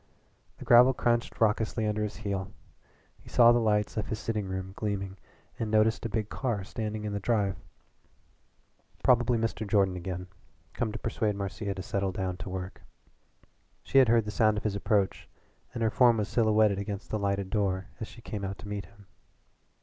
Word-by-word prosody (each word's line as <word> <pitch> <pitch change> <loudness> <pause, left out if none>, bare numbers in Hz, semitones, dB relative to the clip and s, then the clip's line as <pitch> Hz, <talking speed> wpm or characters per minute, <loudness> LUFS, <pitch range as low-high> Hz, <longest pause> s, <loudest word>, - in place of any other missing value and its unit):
The - - -10
gravel 125 +2 +7
crunched 120 -1 0
raucously 110 0 +1
under 105 0 -1
his 105 0 -3
heel. 95 -2 -2 0.7
He - - -15
saw 120 -1 +7
the 120 - +4
lights 105 -2 +1
of 105 - -1
his 110 - -3
sitting 105 -2 -3
room 95 0 -5
gleaming 100 -2 -3 0.4
and 115 - -2
noticed 110 +1 +3
a - - -9
big 110 -1 -2
car 115 -5 -2
standing 110 +1 -4
in 105 -1 -3
the 100 - -1
drive. 100 -3 +1 1.5
Probably 120 -2 +4
Mr. 110 -1 -2
Jordan 100 -3 +2
again, 90 0 -5 0.5
come 115 -2 -2
to 110 - -5
persuade 110 -2 -1
Marcia 100 0 -4
to 95 - -6
settle 100 +1 -1
down' 90 -1 -3
to 95 +1 -7
work. 95 0 -6 1.0
She 135 - +4
had 130 - +6
heard 115 -1 +4
the 105 - -4
sound 110 -1 +3
of - - -3
his 105 -2 -1
approach 100 -1 0 0.4
and 120 -2 -3
her 110 - +2
form 120 -3 +5
was 105 -1 -1
silhouetted 110 -3 +3
against 100 0 -5
the 110 - -1
lighted 100 -1 -1
door 95 -3 0
as 110 - -5
she 115 - -14
came 105 -4 -5
out 95 0 -4
to - - -10
meet 100 -2 -4
him. 100 +1 -19
105 Hz, 190 wpm, -29 LUFS, 100-110 Hz, 1.5 s, gravel